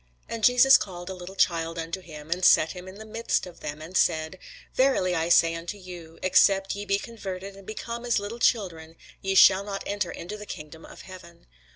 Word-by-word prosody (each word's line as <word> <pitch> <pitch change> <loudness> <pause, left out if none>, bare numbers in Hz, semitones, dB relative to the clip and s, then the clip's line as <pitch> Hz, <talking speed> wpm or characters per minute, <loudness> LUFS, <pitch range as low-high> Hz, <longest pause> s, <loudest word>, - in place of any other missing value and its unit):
And 230 -1 -6
Jesus 250 +2 +7
called 175 -1 -6
a - - -4
little 180 +1 -10
child 165 -3 +1
unto 165 +3 -4
him, 155 -2 -11
and 180 +2 -1
set 160 -2 +5
him 180 0 -9
in 185 - -10
the 220 +2 -10
midst 225 +2 -1
of 180 -2 -13
them, 150 +1 -6
and 175 +4 -10
said, 160 +2 +1 0.3
Verily 255 -9 +2
I 165 -1 -1
say 165 -1 +5
unto 170 +5 -6
you, 175 -4 -11
Except 195 +1 +4
ye 205 +1 -6
be 200 0 +1
converted, 195 -3 -7
and 195 -1 -15
become 235 +2 -6
as 240 -1 +1
little 205 +3 -4
children, 165 -9 0 0.3
ye 195 0 -1
shall 190 0 +7
not 200 -1 -5
enter 205 -3 -2
into 180 +5 -7
the 210 0 -10
kingdom 155 +2 -9
of - - -13
heaven. 180 -2 -13
185 Hz, 210 wpm, -26 LUFS, 170-205 Hz, 0.3 s, Jesus